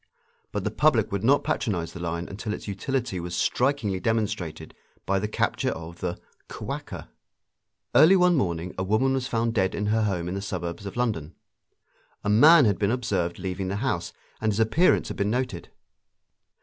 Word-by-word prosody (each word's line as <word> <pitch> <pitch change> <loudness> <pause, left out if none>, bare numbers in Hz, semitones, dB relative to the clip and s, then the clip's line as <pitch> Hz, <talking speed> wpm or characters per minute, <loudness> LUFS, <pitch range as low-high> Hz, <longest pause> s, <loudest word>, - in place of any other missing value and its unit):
But - - -3
the - - -1
public - - +2
would 100 0 -2
not 140 +5 +4
patronise 90 -8 -2
the - - -8
line 85 0 -3
until 105 +2 -4
its - - -10
utility 115 +1 -2
was 85 0 -5
strikingly 125 -8 0
demonstrated 90 -8 -2 0.3
by 95 0 +1
the 105 - -2
capture 105 - 0
of 85 +1 -7
the 90 -1 -3 0.3
"Kwaker." - - -6 0.8
Early 155 +10 +7
one 180 -1 +4
morning 90 - -1
a - - 0
woman 110 +7 +2
was 130 -2 -1
found 115 0 0
dead 95 -4 +1
in 105 - -2
her 110 - +2
home 90 -4 -1
in 90 - -3
the 100 - -3
suburbs 90 0 -5
of 100 - -8
London. 105 -12 -2 0.9
A 105 - -1
man 145 +8 +7
had 100 -3 +1
been 100 -1 +2
observed 105 -8 -1
leaving 95 0 -4
the 95 - -2
house, 105 -6 -2 0.3
and 110 0 +2
his 105 - -2
appearance 115 +12 +3
had - - -6
been 100 +1 0
noted. 125 -6 -2
100 Hz, 180 wpm, -26 LUFS, 90-120 Hz, 0.9 s, Early